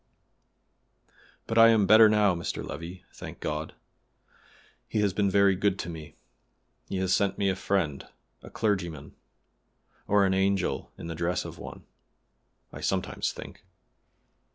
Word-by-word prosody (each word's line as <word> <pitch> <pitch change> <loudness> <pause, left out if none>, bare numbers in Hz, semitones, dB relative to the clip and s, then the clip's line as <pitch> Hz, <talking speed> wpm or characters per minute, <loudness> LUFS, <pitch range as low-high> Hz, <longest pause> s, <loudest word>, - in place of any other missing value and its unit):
"But 115 0 +1
I 115 - +9
am 110 -3 +4
better 110 +2 +8
now, 105 -2 +3
Mr. 85 -1 -4
Levi, 85 +3 -8
thank - - -9
God. 75 +1 -4 1.1
He 110 - -1
has 100 -3 +1
been 100 0 +1
very 100 0 +4
good 100 +1 +1
to 85 - -5
me: 80 -2 -10 0.7
he 95 - -2
has 95 -1 +1
sent 100 -1 +1
me 100 - +1
a 95 - 0
friend, 90 -7 -1 0.3
a - - -12
clergyman, 85 -9 -2 0.9
or 100 -1 +4
an 95 - +1
angel 95 0 0
in - - -8
the 85 - -4
dress 85 +2 -2
of - - -9
one, - - -9 0.9
I - - -8
sometimes - - -1
think. - - -11
95 Hz, 145 wpm, -27 LUFS, 85-100 Hz, 1.1 s, I